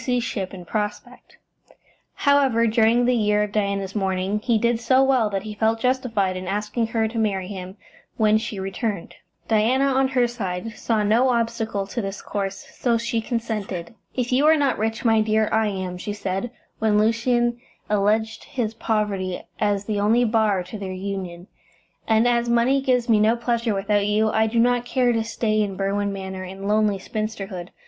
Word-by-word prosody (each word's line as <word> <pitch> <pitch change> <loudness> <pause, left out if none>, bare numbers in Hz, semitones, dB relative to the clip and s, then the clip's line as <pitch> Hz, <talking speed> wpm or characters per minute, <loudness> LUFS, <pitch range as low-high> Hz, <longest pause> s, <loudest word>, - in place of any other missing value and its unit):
ship 195 -5 -3
in 180 -2 -9
prospect. 210 +3 -5 0.8
However, 275 -5 +3
during 230 +2 +3
the 250 - +3
year 210 -3 +2
of 210 - -4
Diana's 200 -2 -1
mourning 190 0 -1
he 230 +1 +1
did 235 +1 +1
so 260 +2 +4
well 260 -5 +3
that 195 -1 -3
he 215 -1 -6
felt 220 +2 +1
justified 230 -7 0
in 185 0 -6
asking 210 +4 -1
her 225 0 0
to 225 +1 -4
marry 195 -4 0
him 190 0 -7 0.4
when 215 -1 +4
she 220 -3 -5
returned. 195 0 -3 0.3
Diana, 230 +5 +3
on 270 -1 +2
her 255 -2 +2
side, 205 -3 -4
saw 220 -2 0
no 230 +5 +3
obstacle 230 -4 -1
to 235 +5 -4
this 195 0 -5
course, 195 -1 -4
so 235 -2 0
she 230 0 -1
consented. 215 -7 -4 0.2
"If 250 -1 -1
you 270 +4 +4
are 315 0 +6
not 280 -6 +1
rich, 225 +3 -2
my 225 -1 +4
dear, 215 0 +2
I 220 0 +2
am," 185 -3 -4
she 205 - -4
said, 200 +2 -3 0.3
when 215 -1 +2
Lucian 240 +2 +1 0.3
alleged 210 +2 0
his 240 -6 -3
poverty 205 -5 -2 0.2
as 205 -1 0
the 210 -1 -1
only 225 +4 +3
bar 215 -4 +2
to 185 +4 -8
their 195 -2 -5
union, 185 -2 -5 0.6
"and 220 +1 +4
as 240 -1 +1
money 240 +4 +3
gives 250 -3 +1
me 220 -3 +4
no 220 +2 +4
pleasure 235 -2 -1
without 205 +1 +1
you, 215 +1 +2
I 220 0 +2
do 225 +2 -2
not 245 +1 +3
care 245 -1 +1
to 225 -1 0
stay 220 -1 0
in 200 -2 -2
Berwin 200 +1 -1
Manor 190 -1 -6
in 190 +2 -7
lonely 210 -1 +2
spinsterhood. 195 -3 -5
215 Hz, 180 wpm, -23 LUFS, 200-235 Hz, 0.8 s, are